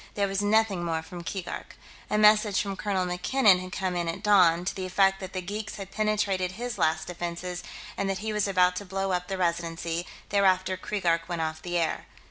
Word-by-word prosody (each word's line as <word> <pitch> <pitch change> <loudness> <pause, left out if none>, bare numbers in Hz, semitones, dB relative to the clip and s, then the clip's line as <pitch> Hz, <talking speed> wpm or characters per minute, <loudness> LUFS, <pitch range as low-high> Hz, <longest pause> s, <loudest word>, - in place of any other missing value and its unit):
There 200 -1 +1
was 195 0 -1
nothing 205 -3 +2
more 165 -1 -1
from 175 0 -9
Keegark. 185 0 -6 0.3
A 210 - +1
message 210 -1 +5
from 200 -1 -2
Colonel 190 -2 -1
MacKinnon 185 +3 +3
had 185 0 -7
come 185 0 -2
in 175 -1 -1
at 165 - -4
dawn, 180 -4 +5
to - - -1
the 185 -1 -4
effect 195 +1 +3
that 190 -2 -7
the 185 -1 -3
geeks 210 +4 -5
had 195 -1 -8
penetrated 200 -4 0
his 240 0 -5
last 160 -1 +1
defenses 175 +1 -5 0.3
and 195 - -1
that 195 - -1
he 215 +2 -3
was 210 -1 +1
about 180 -2 +3
to 205 - -4
blow 195 +1 -2
up 180 0 -1
the 195 - -3
Residency; 170 -1 -2 0.2
thereafter 190 -2 +3
Keegark 175 -3 -1
went 170 -2 -1
off 160 0 -4
the 175 0 -2
air.... 165 -2 -1
185 Hz, 210 wpm, -27 LUFS, 175-200 Hz, 0.3 s, message